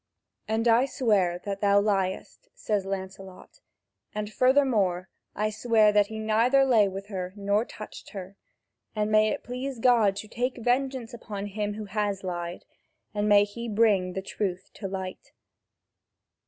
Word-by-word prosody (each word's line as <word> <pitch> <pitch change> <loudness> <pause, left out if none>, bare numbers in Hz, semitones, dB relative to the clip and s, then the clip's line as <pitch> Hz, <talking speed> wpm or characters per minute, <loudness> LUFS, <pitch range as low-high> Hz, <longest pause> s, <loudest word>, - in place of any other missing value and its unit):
"And 220 +2 0
I 235 +3 +5
swear 205 -9 +1
that 200 -1 -4
thou 200 -1 +5
liest," 200 - -1
says 205 -3 -2
Lancelot, 190 -1 -7 0.6
"and 210 0 -4
furthermore 215 -8 +2 0.3
I 215 +1 0
swear 215 -1 +3
that 205 -1 +3
he 220 0 -7
neither 230 +5 +3
lay 225 -6 +4
with 195 +1 -6
her 185 -2 -4
nor 205 +2 +1
touched 215 - -10
her. 195 0 -8 0.6
And 210 0 0
may 215 0 +5
it - - -3
please 255 +2 -5
God 225 -4 +4
to 200 +2 -6
take 245 +4 -2
vengeance 250 0 -1
upon 210 -4 -6
him 205 0 -3
who 215 0 -6
has 205 -1 -2
lied, 175 -1 -5 0.5
and 210 0 0
may 205 0 +7
He 235 +3 -6
bring 205 -4 +2
the 190 - -4
truth 190 -2 -4
to 195 - -6
light! 190 -1 -6
210 Hz, 155 wpm, -27 LUFS, 195-230 Hz, 0.6 s, may